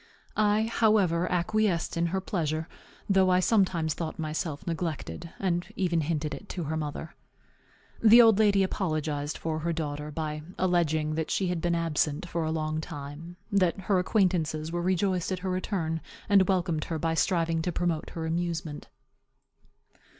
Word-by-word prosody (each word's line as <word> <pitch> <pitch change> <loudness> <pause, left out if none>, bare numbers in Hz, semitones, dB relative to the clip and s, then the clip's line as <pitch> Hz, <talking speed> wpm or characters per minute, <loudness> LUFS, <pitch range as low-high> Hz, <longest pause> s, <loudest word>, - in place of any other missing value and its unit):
I, 215 0 +3
however, 210 -6 +2
acquiesced 180 0 +1
in 170 0 +1
her 190 +3 -1
pleasure, 160 -4 -2 0.4
though 190 -2 +4
I 180 0 +4
sometimes 185 -6 +2
thought 160 -2 -5
myself 155 0 -3
neglected, 165 - -4
and 175 -2 -1
even 170 -3 +1
hinted 150 -1 -2
it 140 - -9
to 175 - -4
her 155 +1 -2
mother. 155 +1 -4 0.9
The 230 +1 +8
old 225 -3 +7
lady 200 -2 +4
apologized 155 -6 -2
for 160 -1 -2
her 170 +2 -1
daughter, 150 -2 -3
by 150 0 -4 0.2
alleging 160 -4 +1
that 160 0 -2
she 190 -2 0
had 175 -2 -2
been 175 0 +1
absent 165 0 0
for 170 -1 -2
a 160 - -1
long 155 0 -1
time; 155 +2 -8 0.2
that 195 -1 +2
her 190 0 +2
acquaintances 170 -5 +1
were 175 0 -1
rejoiced 185 0 0
at 185 - 0
her 185 - 0
return, 175 -4 -2 0.3
and 195 -2 +5
welcomed 170 -4 +1
her 165 - -3
by 165 +1 0
striving 165 -1 +1
to 175 - -1
promote 170 -2 -1
her 165 -1 -3
amusement. 165 -2 -3
170 Hz, 160 wpm, -28 LUFS, 155-185 Hz, 0.9 s, The